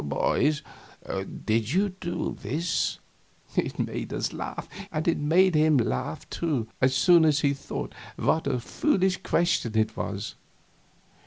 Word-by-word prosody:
"Boys, 150 - +1 0.8
did 115 +3 +1
you 200 +3 +3
do 185 -2 -4
this?" 165 +7 -1 0.6
It - - 0
made - - -3
us - - -2
laugh. - - -5 0.2
And 155 +1 -2
it 170 - +2
made 175 +5 +4
him 155 -1 +4
laugh, 65 - -1
too, 145 -10 -1
as 130 0 +4
soon 170 +5 +6
as 150 -2 +3
he 140 -1 +3
thought 140 - -5 0.2
what 160 - +1
a 125 - +1
foolish 190 - +1
question 165 - +1
it 110 0 +1
was. 100 +1 -4
150 Hz, 140 wpm, -27 LUFS, 120-170 Hz, 0.8 s, soon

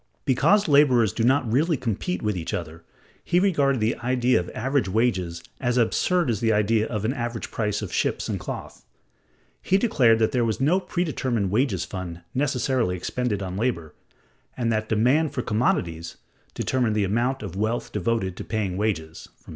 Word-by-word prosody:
Because 195 +10 +3
laborers 130 -7 +4
do 115 - -1
not 130 +1 +3
really 155 +6 +2
compete 120 - -3
with 105 -2 0
each 85 -3 -3
other, 85 0 -7 0.4
he 175 - +2
regarded 145 -8 +2
the 110 +2 +1
idea 125 -1 +2
of 90 - -5
average 130 -3 0
wages 95 -6 0 0.2
as 125 -1 0
absurd 160 +6 +2
as 110 - -2
the 115 0 +2
idea 110 +1 +2
of 105 -2 -3
an 120 - +1
average 120 -4 -4
price 105 -1 -1
of 95 - -6
ships - - 0
and - - -2
cloth; - - -7 0.8
he 190 - +2
declared 130 - +3
that 110 -1 +1
there 125 -2 +1
was 110 -2 -1
no 155 +8 +3
predetermined 130 - -1
wages 105 -6 +1
fund 90 -2 -6
necessarily 130 -6 0
expended 105 +2 -2
on 95 -1 -5
labor; 100 -9 -2 0.6
and 115 -2 0
that 110 0 -1
"demand 130 +8 +2
for 125 - -1
commodities" 85 -7 -1 0.4
determined 125 -5 0
the 105 - +2
amount 120 +7 0
of 85 - -6
wealth 110 +4 -2
devoted 105 -2 -1
to - - -5
paying 105 -4 -2
wages 85 -7 -3 0.2
(p. - - -14
115 Hz, 175 wpm, -24 LUFS, 100-130 Hz, 0.8 s, laborers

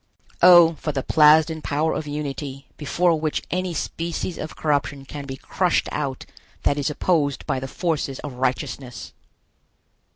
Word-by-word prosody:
O, 175 -2 +8
for 150 - -2
the 135 -2 -3
Plasden 155 +1 +5
power 155 +2 0
of 155 - -4
unity, 145 -2 -5
before 165 +2 +1
which 155 -1 -2
any 180 -1 -1
species 170 +2 -3
of 155 - -6
corruption 145 -2 -1
can 145 +1 -7
be 135 0 -6
crushed 180 +5 0
out 140 -3 -3 0.4
that 145 - +1
is 140 - 0
opposed 150 -2 0
by 130 - -1
the 135 - -5
forces 150 -3 -2
of 145 - -6
righteousness! 125 -1 -3
150 Hz, 150 wpm, -23 LUFS, 140-160 Hz, 0.4 s, O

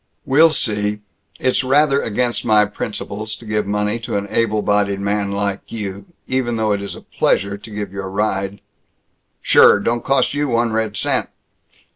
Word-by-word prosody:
"We'll 155 +5 +6
see. 105 -7 -1 0.4
It's 130 0 +1
rather 140 +2 +3
against 120 +2 -1
my 105 -2 +4
principles 105 +1 -5
to 115 - -13
give 105 -1 -1
money 105 +2 -1
to 115 -2 -3
an 100 - -2
able 110 -2 +1
bodied 100 -1 +1
man 100 0 -1
like 100 0 -1
you, 100 -3 -6 0.2
even 130 -2 -1
though 110 -1 0
it 100 -1 0
is 100 - -6
a - - -11
pleasure 100 0 0
to 100 +3 -12
give 105 -2 -5
you 100 - -4
a 95 - -5
ride 100 0 -2 0.4
" - - -49
"Sure! - - +6
Don't 115 +3 -1
cost 135 0 +2
you 145 0 0
one 120 -2 +1
red 110 -1 -1
cent!" - - 0
105 Hz, 180 wpm, -19 LUFS, 100-115 Hz, 0.4 s, We'll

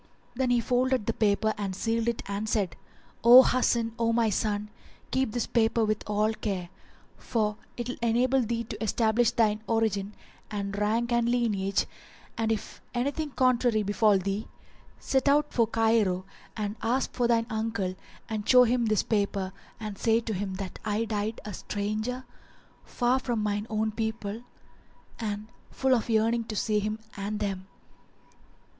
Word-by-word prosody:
Then 255 +1 0
he 245 -1 +4
folded 250 0 +1
the 230 - 0
paper 215 0 +2
and 195 -2 -2
sealed 225 +3 -1
it 235 -1 -1
and 200 +2 -3
said, 200 -7 0 0.5
"O 245 +3 +10
Hasan, 235 -3 +1
O 230 0 +2
my 230 -2 +2
son, 210 +1 -1 0.4
keep 260 -3 +1
this 240 +1 -1
paper 225 -1 +2
with 215 0 0
all 210 +1 +2
care; 190 -5 -3 0.5
for 210 -2 -1 0.2
it 240 -1 -3
will 250 - -4
enable 245 +3 +3
thee 230 0 -1
to 220 0 -5
stablish 225 +2 +3
thine 220 -3 +1
origin 210 -3 0 0.3
and 200 -1 -3
rank 220 +4 0
and 235 0 +2
lineage 205 -5 +1 0.5
and, 225 -1 0
if 220 - -4
anything 285 +5 -1
contrary 245 -4 +2
befal 205 0 +3
thee, 195 +3 -3 0.5
set 270 +1 +1
out 295 +1 +2
for 230 -2 +3
Cairo 220 -5 +2 0.3
and 210 0 -3
ask 245 +4 0
for 245 -1 +1
thine 230 -1 +2
uncle 220 -4 -1 0.3
and 215 -1 -4
show 250 -1 +8
him 240 -1 +2
this 215 -2 +2
paper 200 -3 -1 0.3
and 210 -2 -6
say 225 0 +3
to 225 -1 -4
him 190 0 -3
that 190 -2 -6
I 215 +2 0
died 215 0 -2
a 210 - -5
stranger 215 +7 -3 0.6
far 245 +1 +1
from 240 -4 -2
mine 205 0 -1
own 220 0 0
people 220 -1 -3 0.8
and 210 -2 -3 0.2
full 265 -1 +1
of 235 -2 0
yearning 225 +1 +2
to 220 - -5
see 210 0 +1
him 215 +1 -2 0.2
and 205 +1 -3
them." 190 -2 -3
220 Hz, 160 wpm, -28 LUFS, 210-235 Hz, 0.8 s, O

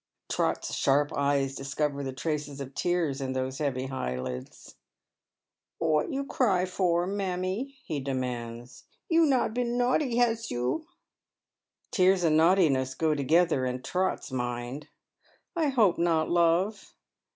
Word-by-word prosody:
Trot's - - -1
sharp 145 +2 +2
eyes 140 -1 +1
discover 140 +1 -2
the 135 - -3
traces 145 +1 -3
of 140 0 -7
tears 165 -6 0
in 130 -1 -2
those 130 0 -3
heav^ 135 -3 -2
eyelids. 65 - -5 0.5
" - - -63
What 155 -2 +1
for - - -5
you 275 0 -1
ciy, 180 -7 +1
mammie? 195 +6 -2
" - - -32
he 155 -3 -2
demands. 125 -3 -5
" - - -52
You 330 -1 +5
not 255 -5 +2
been 245 0 -1
naughty, 250 +1 +1
has 230 -2 +1
you? 125 - -2 0.5
" - - -52
Tears 185 -1 +3
and 160 -2 +3
naughtiness 160 -6 +3
go 160 -1 +1
together 155 0 +2
in 125 0 -3
Trot's 185 -5 -1
mind. 125 +2 -4 0.4
" - - -39 0.3
I 325 -3 +1
hope 230 -10 +3
not, 165 -2 +2
love." 175 +4 +1
155 Hz, 145 wpm, -28 LUFS, 130-190 Hz, 0.5 s, You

